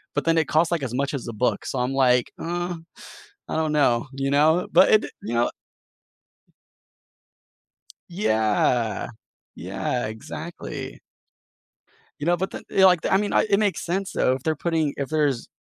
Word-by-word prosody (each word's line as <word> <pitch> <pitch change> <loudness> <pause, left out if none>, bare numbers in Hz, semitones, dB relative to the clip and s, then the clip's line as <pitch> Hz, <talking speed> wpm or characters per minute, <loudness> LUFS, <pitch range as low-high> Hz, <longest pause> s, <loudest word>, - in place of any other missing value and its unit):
But 145 - 0
then 165 0 +3
it 160 - +2
costs, 160 +2 +2
like, 170 -4 0
as 125 -3 -4
much 140 - -2
as 135 -4 -4
a 115 - -5
book, - - 0
so - - -3
I'm 125 +2 -1
like, 125 -2 +3
"Uh, 175 +1 -3 0.7
I - - -3
don't 155 -1 0
know." 120 0 +2
You 135 +1 -2
know? 155 +5 +3
But - - +7
it 215 - +6
d - - -5
you 115 - -4
know 120 +1 +2 2.6
Yeah, 110 - +1 0.5
yeah, 120 -2 -3
exactly. 110 0 -7 1.2
You 145 - -5
know, 175 - +3
but 190 +2 -3
then, - - -8
you - - -5
know, 190 - +8
like, 180 -3 +5
I - - +5
mean, 205 +1 -1 0.2
it 200 - +3
makes 200 -5 0
sense, 190 +3 -2
though, - - +2
if 130 - -7
they're 160 -2 0
putting 160 -3 0
if 140 -1 -3
there's 145 -6 0
150 Hz, 175 wpm, -24 LUFS, 125-175 Hz, 2.6 s, know